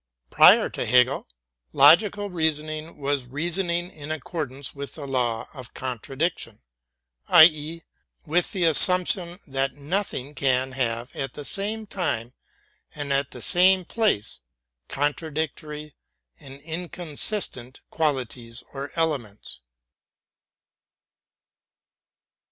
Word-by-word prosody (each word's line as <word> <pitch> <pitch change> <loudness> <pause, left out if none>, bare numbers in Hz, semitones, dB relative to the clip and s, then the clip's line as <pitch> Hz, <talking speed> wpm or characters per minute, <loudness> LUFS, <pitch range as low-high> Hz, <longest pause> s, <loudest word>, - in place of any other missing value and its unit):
Prior - - +7
to - - -4
Hegel, 125 +2 +3 0.5
logical 205 +7 +5
reasoning 155 -1 -1
was 140 -3 -2
reasoning 175 +5 -1
in 150 -1 -10
accordance 145 -3 -5
with 140 0 -8
the 145 - -6
law 120 -4 -1
of 130 -4 -10
contradiction, 130 0 -3 0.7
i. 165 - +9
e., 160 +1 +2 0.4
with 170 +3 +1
the 190 -5 -2
assumption 175 +1 +4
that 135 0 -1
nothing 145 -2 -3
can 130 -1 0
have 120 -1 -2
at 135 -2 -4
the 145 - -7
same 215 +5 -3
time 140 - -3 0.6
and 145 -2 -2
at 135 -1 +1
the 125 - -8
same 185 +1 +4
place 210 - -1 0.5
contradictory 150 0 -3 0.5
and 135 0 -11
inconsistent 165 - -5
qual 155 -3 +2
ities 120 -1 -6
or 140 0 -6
elements. 140 -11 -3
150 Hz, 105 wpm, -24 LUFS, 135-170 Hz, 0.7 s, i